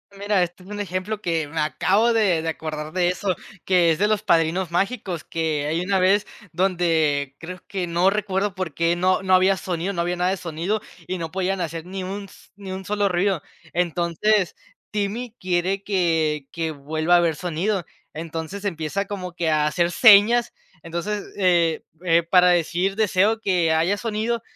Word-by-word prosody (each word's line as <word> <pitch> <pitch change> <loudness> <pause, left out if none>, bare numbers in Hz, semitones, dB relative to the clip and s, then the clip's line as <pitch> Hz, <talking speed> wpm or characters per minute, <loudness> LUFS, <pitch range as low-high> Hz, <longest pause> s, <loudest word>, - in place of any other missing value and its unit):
Mira, 200 -1 +1
este 175 +1 -3
es 185 - -15
un 210 0 -6
ejemplo, 200 +2 -3
que 165 -5 -1
me 160 +2 -4
acabo 200 +9 +2
de 200 -8 +2
de 165 - -5
acordar 155 -1 -5
de 180 -1 +2
eso, 180 +1 -1 0.3
que 180 -3 +4
es 160 - -1
de 205 - +3
Los 215 -1 0
Padrinos 170 +2 +1
Mágicos, 185 -3 -2
que 160 -3 -1
hay 160 +3 0
una 190 +1 +1
vez 195 +3 +3 0.3
donde 160 -6 +1
creo 180 +2 -8
que 185 -3 -3
no 170 +3 +3
recuerdo 200 -1 -1
por 185 -5 -4
qué 170 +2 +1
no 185 +2 +2
no 190 -1 +1
había 190 +1 +4
sonido, 180 +1 -3
no 175 -3 -2
había 175 +1 -1
nada 180 +1 +1
de 195 - -1
sonido 175 +5 -2 0.3
y 185 - -2
no 165 -2 -4
podían 190 +1 -1
hacer 165 -1 -4
ni 190 +1 -5
un 200 +2 -5
s 195 - -18
ni 195 -1 -8
un 190 0 -6
solo 205 0 +1
ruido. 180 -1 +1 0.3
Entonces, 175 +3 +1 0.4
Timmy 215 +3 -3
quiere 185 +2 0
que 160 -7 0
que 165 -1 -2
vuelva 155 +4 +1
a - - +4
ver 170 -2 +1
sonido. 180 +4 -1 0.3
Entonces 165 +4 -6
empieza 190 0 -2
como 185 -3 -5
que 170 -2 -1
a 155 -1 +2
hacer 170 +3 +1
señas, 225 +3 +6 0.3
entonces, 185 +5 -3
eh, 175 -4 +2 0.2
eh, 170 -1 +4
para 180 +2 +5
decir: 175 +3 +1
"Deseo 215 +1 +2
que 175 -6 +2
haya 170 +6 +2
sonido", 225 +1 -2
180 Hz, 185 wpm, -23 LUFS, 165-200 Hz, 0.4 s, señas